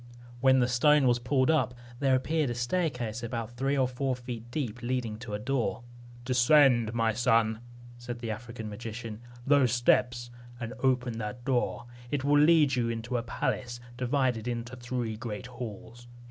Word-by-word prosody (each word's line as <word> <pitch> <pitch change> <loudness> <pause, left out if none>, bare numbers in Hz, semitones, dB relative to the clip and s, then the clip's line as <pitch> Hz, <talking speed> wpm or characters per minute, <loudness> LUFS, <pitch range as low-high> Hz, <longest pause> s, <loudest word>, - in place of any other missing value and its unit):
When 130 +1 +5
the 125 -2 +3
stone 140 +3 +4
was 120 -1 +3
pulled 130 +3 +2
up, 130 -5 +1 0.2
there 135 -2 +3
appeared 150 +2 0
a 120 - -3
staircase 125 -4 -1
about 115 -1 -4
three 135 +3 0
or 130 -1 +3
four 130 +1 -2
feet 120 -2 -7
deep, 120 -4 -4
leading 120 -3 -2
to 115 -4 -5
a - - -1
door. 120 +1 -2 0.4
"Descend, 125 -2 +4
my 115 -1 +2
son," 115 -1 +2 0.4
said 120 0 -6
the 115 -2 -4
African 115 0 -7
magician, 110 +1 -7 0.2
"those 140 -4 +4
steps, 120 0 +2 0.3
and 115 0 -5
open 125 -3 +1
that 115 +3 -6
door. 125 -2 0 0.2
It 140 -1 -1
will 145 +1 +4
lead 150 -4 +5
you 120 -2 0
into 115 +2 -3
a 120 - +1
palace, 120 +1 -3 0.2
divided 125 -2 0
into 120 +1 -4
three 120 -3 -3
great 115 +1 -6
halls. 120 -1 -9
120 Hz, 165 wpm, -29 LUFS, 115-130 Hz, 0.4 s, When